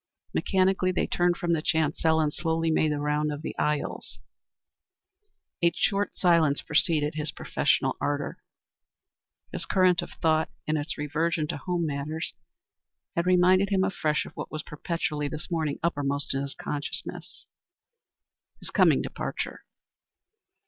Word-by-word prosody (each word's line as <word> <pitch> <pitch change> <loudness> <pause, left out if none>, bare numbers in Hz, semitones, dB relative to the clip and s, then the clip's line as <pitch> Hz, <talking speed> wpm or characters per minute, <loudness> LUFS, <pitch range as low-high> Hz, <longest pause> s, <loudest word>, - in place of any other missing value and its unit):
Mechanically, 185 -1 +2
they - - 0
turned 175 0 +1
from 170 -1 0
the 160 - +1
chancel 160 0 +2
and 150 -2 +1
slowly 165 -1 0
made 155 -1 +2
the 150 - 0
round 150 +1 0
of 145 +1 -5
the - - -4
aisles. 150 -1 -2 1.4
A 170 0 +5
short 200 +2 0
silence 165 -5 +3
succeeded 150 -1 +2
his 155 0 -3
professional - - +1
ardor. 145 -1 -2 1.1
His - - -3
current 185 -2 +4
of - - -7
thought, 160 0 +2 0.2
in 155 - 0
its 150 +1 -3
reversion 155 +2 0
to - - -2
home 175 +2 -1
matters, 150 +2 -3 0.8
had 170 +1 0
reminded 185 +2 +5
him 190 -2 +2
afresh 155 -6 0
of - - -11
what - - -5
was 155 0 -4
perpetually 150 -1 -2
this 155 +5 -6
morning 155 -4 0
uppermost 145 -4 0
in 135 - -1
his 140 0 -5
consciousness 145 -1 -5 1.1
his - - -9
coming - - +4
departure. - - -4
160 Hz, 140 wpm, -27 LUFS, 150-175 Hz, 1.4 s, A